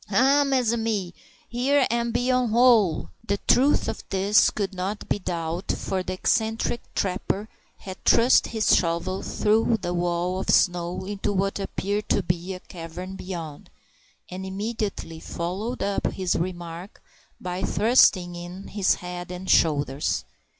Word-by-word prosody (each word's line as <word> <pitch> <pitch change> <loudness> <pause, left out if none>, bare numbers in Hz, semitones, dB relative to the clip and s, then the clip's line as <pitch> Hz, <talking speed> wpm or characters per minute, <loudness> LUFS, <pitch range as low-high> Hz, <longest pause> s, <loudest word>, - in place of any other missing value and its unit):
"Ha! 270 +8 +4
mes 260 -4 +1
ami, 220 -6 -1 0.3
here 265 +3 +2
am 235 0 0
be 245 +2 +1
one 250 -2 +2
hole." 225 -7 +4 0.2
The 200 - +1
truth 275 +4 +4
of - - -4
this 195 +2 +4
could 200 -2 -3
not 190 +3 -4
be - - 0
doubted, 170 0 -3
for 190 - -2
the 185 - -4
eccentric 220 +4 0
trapper 195 +2 -1 0.3
had 190 -2 -10
thrust 240 +3 +5
his 220 -2 +3
shovel 175 +2 0
through 220 +2 +1
the 175 - -1
wall 175 +1 -1
of - - -4
snow 175 0 +2
into 205 0 -2
what 195 0 -1
appeared 200 +1 -3
to 200 - +2
be 175 +2 -2
a - - -8
cavern 180 +2 -8
beyond, 170 -6 -7 0.6
and 185 +1 -6
immediately 200 -4 -4
followed 190 +10 -4
up 200 0 0
his 185 -2 -1
remark 175 +1 -5 0.4
by 180 0 -4
thrusting 200 -5 +4
in 175 +3 -8
his 200 -2 +2
head 180 0 -7
and 180 +1 -3
shoulders. 145 -3 +2
190 Hz, 145 wpm, -25 LUFS, 175-220 Hz, 0.6 s, thrust